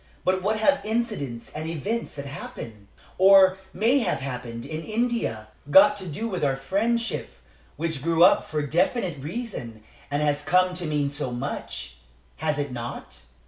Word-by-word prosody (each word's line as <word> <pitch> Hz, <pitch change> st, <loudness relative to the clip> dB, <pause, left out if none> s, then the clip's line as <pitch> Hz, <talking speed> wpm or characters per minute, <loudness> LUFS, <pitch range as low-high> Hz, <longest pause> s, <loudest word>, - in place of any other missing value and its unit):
But 185 Hz, 0 st, +2 dB
what 215 Hz, +3 st, +1 dB
have 280 Hz, +6 st, +3 dB
incidents 215 Hz, -, -3 dB
and 155 Hz, +1 st, -4 dB
events 200 Hz, +9 st, -3 dB
that 140 Hz, -1 st, -6 dB
happened, 115 Hz, -7 st, -8 dB, 0.3 s
or 190 Hz, 0 st, +7 dB
may 230 Hz, +9 st, +3 dB
have 215 Hz, -, 0 dB
happened, 125 Hz, -3 st, -6 dB
in 155 Hz, +3 st, -5 dB
India, 215 Hz, -, -1 dB, 0.2 s
got 195 Hz, +6 st, +7 dB
to 190 Hz, -2 st, -6 dB
do 210 Hz, +9 st, -3 dB
with 185 Hz, -7 st, -3 dB
our 135 Hz, -2 st, +2 dB
friendship, 215 Hz, -, -1 dB, 0.5 s
which 160 Hz, -3 st, -3 dB
grew 165 Hz, +1 st, +3 dB
up 180 Hz, -, +5 dB
for 150 Hz, -1 st, -1 dB
definite 170 Hz, -, 0 dB
reasons 145 Hz, -, -6 dB, 0.3 s
and 145 Hz, +1 st, 0 dB
has 145 Hz, 0 st, +1 dB
come 180 Hz, +3 st, +3 dB
to 180 Hz, -2 st, -4 dB
mean 145 Hz, -2 st, 0 dB
so 145 Hz, -2 st, -3 dB
much 60 Hz, -, -5 dB, 0.4 s
has 155 Hz, -1 st, -1 dB
it 145 Hz, -2 st, -2 dB
not? 120 Hz, -1 st, -7 dB
160 Hz, 160 wpm, -25 LUFS, 140-200 Hz, 0.5 s, or